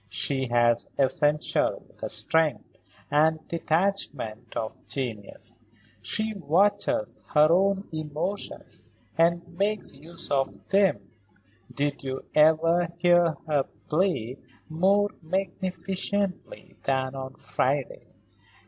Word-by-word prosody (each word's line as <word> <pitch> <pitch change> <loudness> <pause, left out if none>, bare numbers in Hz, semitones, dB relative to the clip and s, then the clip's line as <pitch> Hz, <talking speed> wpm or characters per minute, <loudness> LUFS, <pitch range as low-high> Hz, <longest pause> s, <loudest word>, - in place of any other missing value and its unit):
She 130 +7 -1
has 120 -1 +2
essentially 145 +3 +2 0.2
the - - -4
strength 160 -2 +1 0.3
and 155 +1 +2
detachment 155 - -1
of 110 -1 -5
genius. 115 -4 -5 0.5
She 220 0 -1
watches 205 - +1 0.2
her 150 +1 +7
own 195 +2 +2
emotions 155 +6 -4 0.3
and 170 +1 +2
makes 205 0 0
use 165 +5 -10
of 135 -1 -1
them. 195 - +2 0.6
Did 145 0 -2
you 130 0 -4
ever 165 +3 +4
hear 175 -2 +4
her 150 -3 +1 0.2
play 150 - 0 0.3
more 195 +5 +2
magnificently 185 +2 -3
than 130 -1 0
on 135 0 -6
Friday? 135 0 -2
160 Hz, 95 wpm, -27 LUFS, 135-185 Hz, 0.6 s, her